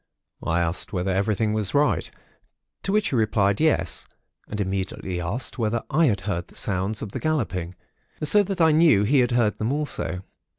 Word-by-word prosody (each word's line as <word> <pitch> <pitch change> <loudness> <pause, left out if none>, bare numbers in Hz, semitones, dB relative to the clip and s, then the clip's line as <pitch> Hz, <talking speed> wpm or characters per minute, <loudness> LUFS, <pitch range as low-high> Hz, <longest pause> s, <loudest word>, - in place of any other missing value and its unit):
I 85 +1 0
asked 85 +1 -2
whether 95 0 -1
everything 105 +2 0
was 110 +2 -1
right; 145 +1 +2 0.7
to 195 - -1
which 210 +1 +1
he - - 0
replied 105 -2 +2
yes, 155 -1 +1 0.4
and 105 - -5
immediately 95 -2 -3
asked 115 +10 -3
me - - -1
whether 110 +1 0
I 160 +4 +4
had 100 -6 0
heard 90 -3 -3
the - - -19
sounds 100 +2 -1
of 105 - -6
the - - -4
galloping; 95 - -2 0.5
so 205 +7 +5
that 195 -1 -3
I 160 -1 +6
knew 155 -10 +5
he 135 +7 +3
had 120 -1 +3
heard 115 -3 +1
them 110 +3 0
also. 145 -11 -2
110 Hz, 185 wpm, -24 LUFS, 95-145 Hz, 0.7 s, I